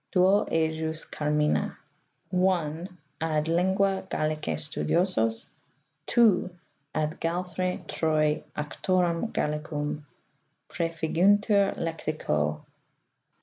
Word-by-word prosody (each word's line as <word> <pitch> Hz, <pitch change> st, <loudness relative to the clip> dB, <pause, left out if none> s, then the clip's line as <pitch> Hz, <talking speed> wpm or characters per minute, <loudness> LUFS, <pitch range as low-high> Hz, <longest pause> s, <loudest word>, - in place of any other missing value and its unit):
Duo 190 Hz, +2 st, +4 dB
ejus 160 Hz, 0 st, -1 dB
carmina 150 Hz, 0 st, 0 dB, 0.6 s
(i) 180 Hz, -3 st, +1 dB, 0.3 s
Ad 155 Hz, -2 st, +1 dB
lingitce 190 Hz, +3 st, +1 dB
Gallica 155 Hz, -, -1 dB
sttediosos; 115 Hz, -, 0 dB, 0.6 s
(2) 220 Hz, -7 st, +4 dB, 0.5 s
Ad 155 Hz, 0 st, -1 dB
Galfr. 180 Hz, +2 st, -2 dB
Troy 155 Hz, -1 st, +1 dB
auctorem 175 Hz, +5 st, 0 dB
Gallicum, 150 Hz, 0 st, -2 dB, 0.7 s
prEefiguntur 190 Hz, +5 st, +2 dB
Lexico 115 Hz, -, -1 dB
Joh. -, -, -28 dB
165 Hz, 75 wpm, -27 LUFS, 150-185 Hz, 0.7 s, Duo